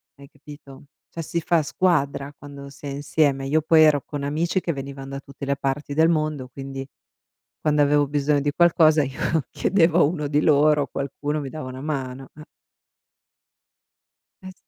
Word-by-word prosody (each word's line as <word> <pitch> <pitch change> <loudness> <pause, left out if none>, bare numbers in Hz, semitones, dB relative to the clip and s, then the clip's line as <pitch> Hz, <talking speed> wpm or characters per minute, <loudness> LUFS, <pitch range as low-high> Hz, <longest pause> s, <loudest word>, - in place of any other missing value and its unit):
Hai 140 0 -15
capito? 145 -2 -14 0.2
Cioè 165 - -6
si 170 +2 -3
fa 170 0 +2
squadra 145 -4 0
quando 140 -1 -10
si 140 +1 -13
è - - -4
insieme. 140 0 0
Io 155 +3 +2
poi 160 +1 +5
ero 150 -2 +4
con 145 -2 -6
amici 165 +6 -1
che 170 - -2
venivan 135 -1 -7
da 135 0 -5
tutte 140 0 -10
le 140 0 -1
parti 140 +1 -3
del 160 +3 +4
mondo, 155 -5 -1
quindi 135 0 -7 0.7
quando 150 -1 +2
avevo 145 0 +3
bisogno 145 0 +1
di 145 +1 0
qualcosa 160 -3 +4
io 140 +4 -1
chiedevo 175 -3 +2
a - - +6
uno 150 0 -1
di 145 +1 +1
loro, 150 -1 +3
qualcuno 145 +2 -4
mi 135 - -6
dava 155 -2 -7
una 130 +1 -8
mano, 135 -3 -5
eh. 150 - -11 2.0
Eh 185 - -9
s - - -14
145 Hz, 175 wpm, -23 LUFS, 140-155 Hz, 2.0 s, a